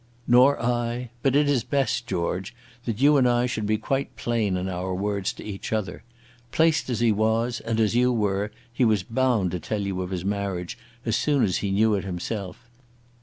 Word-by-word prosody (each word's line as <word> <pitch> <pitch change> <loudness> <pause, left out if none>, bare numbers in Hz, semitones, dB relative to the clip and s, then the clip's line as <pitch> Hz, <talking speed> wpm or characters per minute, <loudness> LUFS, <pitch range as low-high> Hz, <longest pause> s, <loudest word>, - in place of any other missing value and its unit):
"Nor 125 +4 +5
I. 120 0 -1
But 135 0 +2
it 145 0 +4
is 135 -5 +2
best, 135 -4 0
George, 95 +4 -2 0.3
that 115 -2 -3
you 145 +2 +5
and 125 -2 +4
I 120 0 +2
should 110 -4 -2
be 110 0 +2
quite 135 +5 -2
plain 110 -6 0
in 90 +1 -3
our 95 0 -3
words 100 0 -1
to - - -10
each 100 -2 -6
other. 110 -3 -2 0.5
Placed 160 -3 +2
as 120 -2 -1
he 115 -2 +4
was, 110 +3 +1
and 115 -1 -2
as 110 0 +2
you 125 +1 +4
were, 105 -2 0 0.2
he 125 - +1
was 110 -5 +3
bound 115 -5 +1
to 90 - -3
tell 105 +6 -3
you 95 -2 -2
of 90 - -4
his 90 -1 -4
marriage 100 0 -2 0.3
as 115 -2 +1
soon 145 0 +2
as 95 -4 +1
he 100 - -2
knew 105 +3 +3
it 100 - 0
himself. 95 +3 -5
110 Hz, 205 wpm, -25 LUFS, 100-125 Hz, 0.5 s, Nor